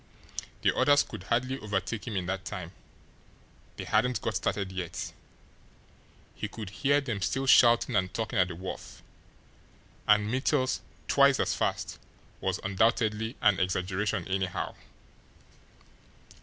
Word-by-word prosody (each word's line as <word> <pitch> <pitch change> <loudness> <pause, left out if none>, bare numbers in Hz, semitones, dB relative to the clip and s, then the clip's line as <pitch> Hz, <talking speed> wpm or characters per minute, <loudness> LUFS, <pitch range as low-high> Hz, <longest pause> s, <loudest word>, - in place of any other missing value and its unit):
The - - +3
others 145 0 +5
could - - -9
hardly 130 +3 0
overtake 105 +2 -3
him 110 - -3
in 95 -2 -1
that 95 +1 -3
time 90 -3 -6 1.1
they - - -4
hadn't 120 +3 +2
got 115 - -2
started 100 0 -1
yet. 90 -3 -5 1.2
He - - -4
could 105 -2 -8
hear 140 +5 +2
them 115 -8 -3
still 135 +8 0
shouting 120 -2 +6
and 95 -2 +1
talking 110 -1 -2
at 90 - +4
the 90 - -6
wharf. 95 +2 -8 1.0
And 105 0 +5
Mittel's 130 +2 +1 0.3
"twice 140 -1 +5
as - - +1
fast" - - -2 0.4
was - - -1
undoubtedly 110 +3 +1
an 105 -3 +5
exaggeration, 90 0 -1
anyhow. 95 -1 -2
105 Hz, 130 wpm, -29 LUFS, 95-125 Hz, 1.2 s, shouting